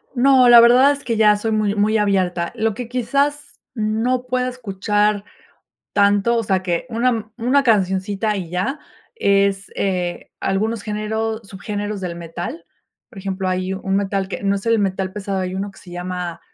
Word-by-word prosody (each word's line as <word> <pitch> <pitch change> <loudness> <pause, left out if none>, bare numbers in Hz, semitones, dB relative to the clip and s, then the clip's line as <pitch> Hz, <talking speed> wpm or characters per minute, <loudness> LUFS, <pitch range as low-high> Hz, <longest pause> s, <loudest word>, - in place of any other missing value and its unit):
No, 260 0 +5
la 240 -1 +9
verdad 250 +4 +6
es 285 - -9
que 230 -2 -1
ya 210 -1 +5
soy 220 +2 -2
muy 210 -1 +1
muy 215 +1 +2
abierta. 185 -4 0
Lo 220 -1 0
que 240 +2 -6
quizás 280 +4 -1
no 230 +3 -1
pueda 250 0 0
escuchar 210 -3 -1 0.7
tanto, 205 +3 +3
o 230 - +1
sea, 190 -3 0
que 175 -2 -1
una 230 -2 0
una 255 +4 +2
cancioncita 200 -1 +1
y 175 -4 -5
ya, 190 - -2 0.3
es, 200 - +1
eh, 180 -3 -2
algunos 215 +3 -1
géneros 220 +1 -3
subgéneros 205 +1 -5
del 175 -2 -4
metal. 175 - -6 0.4
Por 195 - -13
ejemplo, 190 0 -3
hay 185 0 -1
un 190 0 -2
metal 195 -1 0
que 190 - -6
no 200 0 +1
es 195 - -7
el 230 -2 +3
metal 190 -1 -1
pesado, 200 -1 -3
hay 185 0 -3
1 195 +2 -3
que 195 - -18
se 175 - -13
llama 180 -1 -5
205 Hz, 175 wpm, -20 LUFS, 190-230 Hz, 0.7 s, la